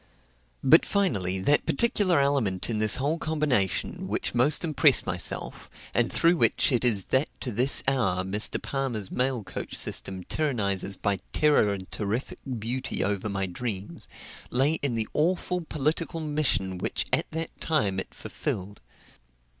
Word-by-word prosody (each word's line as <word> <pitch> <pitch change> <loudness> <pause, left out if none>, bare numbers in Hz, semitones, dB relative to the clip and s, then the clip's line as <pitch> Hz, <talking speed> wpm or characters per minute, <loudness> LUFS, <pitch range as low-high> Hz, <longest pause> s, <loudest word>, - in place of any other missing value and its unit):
But, 155 +5 +6
finally, 100 - 0
that 145 +10 +2
particular 205 -8 +3
element 120 -9 0
in 110 - -1
this 110 -1 +7
whole 145 +5 -1
combination 145 - -1
which - - -2
most 125 +8 +5
impressed 150 -3 +3
myself, 90 -2 -2 0.2
and 120 +3 +2
through 170 +1 +3
which - - +2
it 125 -2 +1
is 105 -6 +2
that 130 +3 +2
to 125 - -3
this 125 +6 +2
hour 95 -9 +1
Mr. 100 +3 +1
Palmer's 125 -8 -4
mail 125 -3 -1
coach - - -6
system 95 -1 -2
tyrannizes 100 - -1
by 100 -2 0
terror 150 -9 +3
and 95 -2 -6
terrific 110 +5 -3 0.2
beauty 125 +5 -2
over 100 +1 -2
my 100 -1 -2
dreams, 100 +1 -5 0.4
lay 140 +6 +1
in 135 -4 0
the 110 -1 -1
awful 180 +3 0
political 160 +1 -2
mission 145 - -1
which - - -2
at - - +2
that 160 0 -4
time 105 -12 0
it - - -6
fulfilled. 100 +2 -5
125 Hz, 145 wpm, -26 LUFS, 100-150 Hz, 0.4 s, this